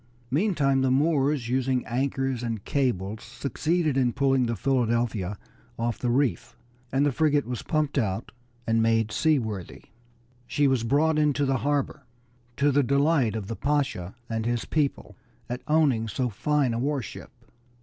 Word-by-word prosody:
Meantime 145 Hz, -5 st, +2 dB
the 130 Hz, -, +2 dB
Moors, 140 Hz, -2 st, +2 dB
using 130 Hz, 0 st, 0 dB
anchors 135 Hz, 0 st, -1 dB
and 115 Hz, -4 st, -4 dB
cables, 110 Hz, -7 st, -1 dB
succeeded 145 Hz, +6 st, -1 dB
in 130 Hz, -3 st, +2 dB
pulling 135 Hz, -3 st, +2 dB
the 115 Hz, -, -1 dB
Philadelphia 115 Hz, -5 st, 0 dB, 0.4 s
off 115 Hz, -1 st, -2 dB
the 125 Hz, -, -1 dB
reef, 130 Hz, +1 st, 0 dB, 0.3 s
and 135 Hz, +2 st, +2 dB
the 145 Hz, -, +2 dB
frigate 150 Hz, 0 st, +2 dB
was 125 Hz, -1 st, -4 dB
pumped 150 Hz, -2 st, 0 dB
out 110 Hz, -2 st, -2 dB, 0.3 s
and 115 Hz, 0 st, +2 dB
made 115 Hz, -1 st, +2 dB
seaworthy. 110 Hz, -, -1 dB, 0.6 s
She 145 Hz, -1 st, +2 dB
was 130 Hz, -4 st, +1 dB
brought 150 Hz, +6 st, +2 dB
into 145 Hz, -1 st, +2 dB
the 135 Hz, -1 st, +1 dB
harbor, 145 Hz, +2 st, -1 dB, 0.6 s
to 145 Hz, +1 st, +3 dB
the 145 Hz, +1 st, +4 dB
delight 140 Hz, -3 st, +2 dB
of 110 Hz, -3 st, -3 dB
the 115 Hz, -, -5 dB
Pasha 135 Hz, -11 st, -1 dB
and 110 Hz, -1 st, -2 dB
his 120 Hz, -1 st, -1 dB
people 150 Hz, -3 st, -2 dB, 0.3 s
at 125 Hz, +2 st, -4 dB
owning 145 Hz, -8 st, +2 dB
so 125 Hz, +3 st, -1 dB
fine 135 Hz, +4 st, 0 dB
a 115 Hz, -, -2 dB
war 140 Hz, 0 st, -1 dB
ship. -, -, -9 dB
130 Hz, 155 wpm, -26 LUFS, 115-145 Hz, 0.6 s, the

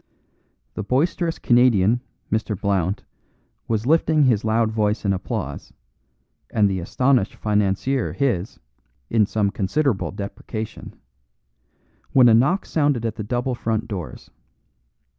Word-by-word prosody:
The -, -, -4 dB
boisterous 165 Hz, -, 0 dB
Canadian, 120 Hz, -2 st, +3 dB, 0.3 s
Mr. 110 Hz, -2 st, -1 dB
Blount, 100 Hz, -1 st, 0 dB, 0.6 s
was 110 Hz, -1 st, -1 dB
lifting 155 Hz, +1 st, +3 dB
his 120 Hz, -6 st, +3 dB
loud 110 Hz, 0 st, +1 dB
voice 105 Hz, -1 st, 0 dB
in 100 Hz, -, +2 dB
applause, 95 Hz, -, -5 dB, 0.8 s
and 105 Hz, -2 st, +3 dB
the 95 Hz, -1 st, -1 dB
astonished 125 Hz, +4 st, +1 dB
financier 105 Hz, +5 st, 0 dB
his 115 Hz, -9 st, -1 dB, 0.5 s
(in 110 Hz, -3 st, +3 dB
some 100 Hz, -2 st, 0 dB
considerable 105 Hz, +4 st, 0 dB
deprecation), 105 Hz, +2 st, -7 dB, 1.2 s
when 130 Hz, -2 st, +7 dB
a 115 Hz, -, +6 dB
knock 135 Hz, -, +3 dB
sounded 145 Hz, -7 st, 0 dB
at 115 Hz, -, -1 dB
the 105 Hz, -, -6 dB
double 125 Hz, +4 st, -2 dB
front 115 Hz, -2 st, -2 dB
doors. 95 Hz, -6 st, -7 dB
110 Hz, 120 wpm, -22 LUFS, 100-130 Hz, 1.2 s, when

